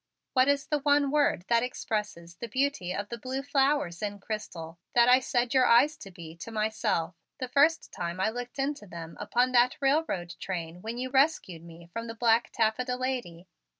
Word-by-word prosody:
What 255 Hz, 0 st, +4 dB
is 285 Hz, -1 st, +2 dB
the 300 Hz, -, 0 dB
one 285 Hz, -1 st, +3 dB
word 290 Hz, -, +2 dB
that 235 Hz, -1 st, +3 dB
expresses 210 Hz, -8 st, -4 dB
the 235 Hz, -, -5 dB
beauty 260 Hz, -6 st, -1 dB
of 200 Hz, +2 st, -4 dB
the 235 Hz, -, -6 dB
blue 260 Hz, +3 st, -4 dB
flowers 275 Hz, -, +1 dB
in 205 Hz, -1 st, -3 dB
crystal 175 Hz, -6 st, -6 dB, 0.2 s
that 240 Hz, 0 st, +6 dB
I 250 Hz, +1 st, +7 dB
said 245 Hz, -2 st, 0 dB
your 260 Hz, -2 st, +5 dB
eyes 280 Hz, +6 st, +5 dB
to 195 Hz, -, -10 dB
be, 165 Hz, -3 st, -11 dB
to 170 Hz, -, -8 dB
myself, 215 Hz, -6 st, -1 dB, 0.2 s
the 255 Hz, -3 st, -4 dB
first 295 Hz, +6 st, +3 dB
time 170 Hz, +1 st, -4 dB
I 205 Hz, +3 st, +1 dB
looked 245 Hz, +2 st, -7 dB
into 275 Hz, -5 st, -2 dB
them 165 Hz, -2 st, -8 dB
upon 245 Hz, +5 st, +1 dB
that 245 Hz, 0 st, +4 dB
railroad 270 Hz, -, 0 dB
train 175 Hz, -2 st, -5 dB
when 225 Hz, +3 st, -5 dB
you 255 Hz, +1 st, -4 dB
rescued 265 Hz, -, +1 dB
me 170 Hz, 0 st, -13 dB
from 230 Hz, 0 st, -4 dB
the 230 Hz, -, -6 dB
black 230 Hz, 0 st, +3 dB
taffeta 245 Hz, +3 st, 0 dB
lady?" 245 Hz, -10 st, -4 dB
235 Hz, 190 wpm, -28 LUFS, 185-265 Hz, 0.2 s, I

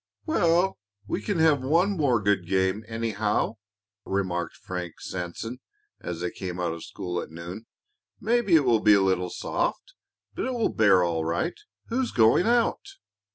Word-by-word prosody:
"Well, 175 Hz, -, +2 dB, 0.3 s
we 100 Hz, -, -3 dB
can 205 Hz, -4 st, -2 dB
have 160 Hz, -4 st, +4 dB
one 165 Hz, +9 st, +2 dB
more 145 Hz, -, +2 dB
good 100 Hz, -4 st, +1 dB
game, 95 Hz, +2 st, +1 dB
anyhow," 110 Hz, -1 st, -1 dB, 0.5 s
remarked 95 Hz, -3 st, -2 dB
Frank 90 Hz, -2 st, -6 dB
Sanson, 95 Hz, +7 st, -5 dB, 0.4 s
as 85 Hz, -1 st, -5 dB
they 90 Hz, -, -2 dB
came 90 Hz, -1 st, -6 dB
out 85 Hz, -2 st, -1 dB
of 85 Hz, -, -8 dB
school 90 Hz, -1 st, -4 dB
at -, -, -8 dB
noon. 85 Hz, +7 st, -8 dB, 0.5 s
"Maybe 220 Hz, -4 st, +2 dB
it 150 Hz, -4 st, +5 dB
will 120 Hz, -3 st, +4 dB
be 105 Hz, -1 st, +6 dB
a 100 Hz, -, +4 dB
little 95 Hz, -2 st, +1 dB
soft, -, -, -3 dB, 0.4 s
but -, -, -3 dB
it 260 Hz, -, -2 dB
will 230 Hz, -, +1 dB
bear 100 Hz, -5 st, +5 dB
all 85 Hz, -2 st, 0 dB
right. 85 Hz, -, -2 dB, 0.3 s
Who's 245 Hz, +1 st, 0 dB
going 115 Hz, -, +4 dB
out?" 240 Hz, -, +2 dB
105 Hz, 160 wpm, -26 LUFS, -, 0.5 s, be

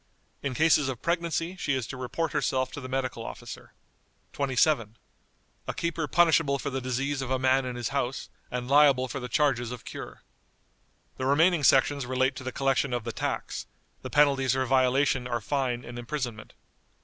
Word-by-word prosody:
In 140 Hz, -3 st, -3 dB
cases 155 Hz, -2 st, +4 dB
of 125 Hz, -3 st, -6 dB
pregnancy 170 Hz, +1 st, -1 dB
she 145 Hz, -6 st, 0 dB
is 130 Hz, -3 st, -2 dB
to 130 Hz, -, -7 dB
report 130 Hz, +6 st, -3 dB
herself 130 Hz, -1 st, 0 dB
to 145 Hz, -, -7 dB
the 130 Hz, -, -7 dB
medical 130 Hz, -3 st, -2 dB
officer." -, -, -9 dB, 0.6 s
"27. 130 Hz, -4 st, +1 dB, 0.7 s
A -, -, -2 dB
keeper 170 Hz, -2 st, -2 dB
punishable 160 Hz, -3 st, +3 dB
for 140 Hz, +1 st, -4 dB
the 135 Hz, 0 st, -2 dB
disease 135 Hz, +3 st, -2 dB
of 130 Hz, -, -4 dB
a 130 Hz, -, +1 dB
man 130 Hz, +1 st, +2 dB
in 125 Hz, -1 st, -4 dB
his 120 Hz, -2 st, -3 dB
house, 135 Hz, -2 st, -2 dB, 0.2 s
and 125 Hz, 0 st, -4 dB
liable 140 Hz, -2 st, +5 dB
for 140 Hz, -, -5 dB
the 125 Hz, -1 st, -6 dB
charges 120 Hz, -3 st, +1 dB
of 125 Hz, -2 st, -8 dB
cure." -, -, -8 dB, 0.9 s
The 130 Hz, -, -2 dB
remaining 160 Hz, +3 st, +4 dB
sections 135 Hz, 0 st, +4 dB
relate 130 Hz, +1 st, +1 dB
to 130 Hz, -, -7 dB
the 130 Hz, -, -4 dB
collection 135 Hz, -1 st, 0 dB
of 120 Hz, -2 st, -1 dB
the 115 Hz, -, -4 dB
tax; -, -, -4 dB, 0.3 s
the -, -, -6 dB
penalties 135 Hz, -4 st, +3 dB
for 130 Hz, 0 st, 0 dB
violation 130 Hz, 0 st, +2 dB
are 120 Hz, -1 st, -1 dB
fine 125 Hz, 0 st, -2 dB
and 120 Hz, 0 st, -7 dB
imprisonment. 120 Hz, -4 st, -5 dB
130 Hz, 180 wpm, -27 LUFS, 125-145 Hz, 0.9 s, liable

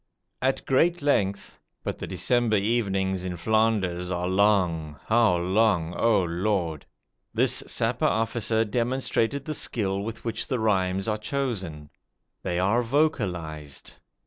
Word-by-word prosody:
At 130 Hz, +1 st, 0 dB
great 165 Hz, +5 st, +2 dB
length 100 Hz, -9 st, 0 dB, 0.2 s
but -, -, -4 dB
the -, -, -5 dB
December 120 Hz, -3 st, +1 dB
evenings 95 Hz, -3 st, 0 dB
in 90 Hz, -1 st, -4 dB
Flanders 95 Hz, -3 st, +1 dB
are 90 Hz, -1 st, -1 dB
long, 90 Hz, -6 st, +1 dB
how 115 Hz, -5 st, +4 dB
long, 90 Hz, -2 st, +2 dB
O 115 Hz, -5 st, +3 dB
Lord! 85 Hz, -3 st, -1 dB, 0.5 s
this -, -, +3 dB
Sapper -, -, 0 dB
officer 115 Hz, 0 st, +1 dB
demonstrated 125 Hz, +3 st, 0 dB
the 155 Hz, -, -3 dB
skill 100 Hz, -8 st, -1 dB
with 110 Hz, +3 st, -6 dB
which 115 Hz, 0 st, -2 dB
the 130 Hz, -, -1 dB
rhymes 95 Hz, -2 st, +1 dB
are 105 Hz, -1 st, 0 dB
chosen. 100 Hz, -, -3 dB, 0.5 s
They 85 Hz, -, -2 dB
are 100 Hz, +7 st, +2 dB
vocalized. 90 Hz, -, -1 dB
105 Hz, 125 wpm, -26 LUFS, 90-115 Hz, 0.5 s, how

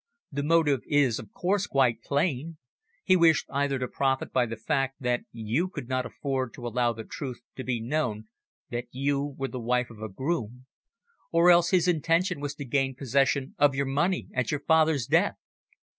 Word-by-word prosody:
The 140 Hz, 0 st, -2 dB
motive 150 Hz, -3 st, +3 dB
is, 140 Hz, -6 st, +2 dB
of 105 Hz, -, -10 dB
course, 195 Hz, +2 st, 0 dB
quite 125 Hz, -5 st, +2 dB
plain. 145 Hz, +3 st, -1 dB, 0.5 s
He 185 Hz, -, +4 dB
wished 165 Hz, -4 st, +4 dB
either 140 Hz, 0 st, 0 dB
to 125 Hz, -1 st, -2 dB
profit 135 Hz, 0 st, -1 dB
by 125 Hz, -2 st, +2 dB
the 115 Hz, -, -5 dB
fact 135 Hz, +4 st, -1 dB
that 125 Hz, 0 st, 0 dB
you 115 Hz, +10 st, -1 dB
could 150 Hz, -9 st, -7 dB
not 130 Hz, -1 st, -1 dB
afford 130 Hz, -4 st, -3 dB
to 120 Hz, -, -9 dB
allow 120 Hz, 0 st, +1 dB
the 115 Hz, -1 st, -7 dB
truth 130 Hz, +1 st, -6 dB, 0.2 s
to 130 Hz, -, -4 dB
be 125 Hz, -3 st, -1 dB
known 115 Hz, -4 st, -2 dB, 0.4 s
that 120 Hz, +1 st, -3 dB
you 140 Hz, +2 st, -1 dB
were 135 Hz, 0 st, -2 dB
the 130 Hz, -, -5 dB
wife 125 Hz, +1 st, 0 dB
of 110 Hz, -1 st, -13 dB
a 110 Hz, -, -4 dB
groom, 125 Hz, -, -3 dB, 0.7 s
or 170 Hz, +1 st, +6 dB
else 170 Hz, 0 st, +5 dB
his 180 Hz, -2 st, +3 dB
intention 170 Hz, +1 st, +1 dB
was 145 Hz, 0 st, -4 dB
to 145 Hz, -, -7 dB
gain 135 Hz, +1 st, 0 dB
possession 135 Hz, +1 st, +1 dB
of 145 Hz, -2 st, +4 dB
your 140 Hz, +1 st, 0 dB
money 150 Hz, +8 st, 0 dB
at 125 Hz, -2 st, -1 dB
your 150 Hz, -, -1 dB
father's 160 Hz, -5 st, +3 dB
death. -, -, +2 dB
135 Hz, 190 wpm, -27 LUFS, 125-155 Hz, 0.7 s, or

